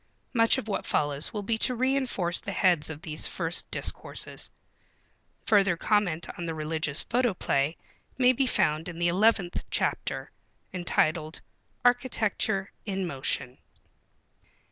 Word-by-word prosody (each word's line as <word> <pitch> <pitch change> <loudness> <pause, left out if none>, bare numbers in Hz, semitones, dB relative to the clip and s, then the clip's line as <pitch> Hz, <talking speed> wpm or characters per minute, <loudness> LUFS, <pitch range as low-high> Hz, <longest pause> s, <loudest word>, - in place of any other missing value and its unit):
Much 230 -2 +5
of - - -4
what 200 - -2
follows 145 0 0
will 210 -2 -4
be 220 +2 -1
to 250 +1 +2
reënforce 255 -9 0
the 200 - -5
heads 175 -6 +2
of 160 +1 -8
these 155 -3 0
first 170 -1 -3
discourses. - - -2 1.0
Further 200 -5 +4
comment 180 -5 +1
on 170 - -3
the 165 - -3
Religious 155 -1 0
Photoplay 180 - 0 0.4
may 255 -1 +5
be 265 +1 +1
found 155 -5 +1
in 170 - -8
the 170 0 +2
eleventh 195 -1 +2
chapter, - - -1 0.4
entitled 160 -3 0 0.4
"Architecture 225 -5 +1
in 195 -3 -2
Motion." 135 -4 -2
180 Hz, 125 wpm, -28 LUFS, 160-220 Hz, 1.0 s, Much